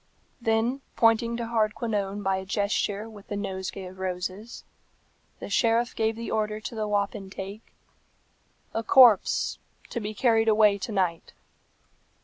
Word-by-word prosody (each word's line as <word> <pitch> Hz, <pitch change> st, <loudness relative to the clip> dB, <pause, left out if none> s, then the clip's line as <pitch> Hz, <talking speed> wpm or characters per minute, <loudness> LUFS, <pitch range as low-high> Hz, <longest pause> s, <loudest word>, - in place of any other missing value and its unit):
Then 230 Hz, +4 st, +1 dB
pointing 230 Hz, +1 st, +3 dB
to 235 Hz, -, -3 dB
Hardquanonne 215 Hz, -3 st, -1 dB
by 195 Hz, -1 st, +1 dB
a 190 Hz, -, -4 dB
gesture 205 Hz, +1 st, -1 dB
with 210 Hz, -3 st, -13 dB
the 205 Hz, -, -4 dB
nosegay 190 Hz, -1 st, -4 dB
of 185 Hz, +1 st, -11 dB
roses, 190 Hz, +4 st, -5 dB, 0.8 s
the -, -, -6 dB
sheriff 230 Hz, +1 st, +1 dB
gave 220 Hz, 0 st, 0 dB
the 230 Hz, +1 st, -6 dB
order 215 Hz, 0 st, -1 dB
to 215 Hz, -, -7 dB
the 215 Hz, -1 st, -2 dB
wapentake, 200 Hz, 0 st, -4 dB, 1.0 s
"A 225 Hz, -, -1 dB
corpse 235 Hz, -3 st, +5 dB, 0.3 s
to 235 Hz, -, -2 dB
be 215 Hz, 0 st, -5 dB
carried 225 Hz, -1 st, +3 dB
away 210 Hz, -2 st, +4 dB
to 220 Hz, -, -5 dB
night." 180 Hz, -5 st, -1 dB
215 Hz, 135 wpm, -26 LUFS, 195-225 Hz, 1.0 s, corpse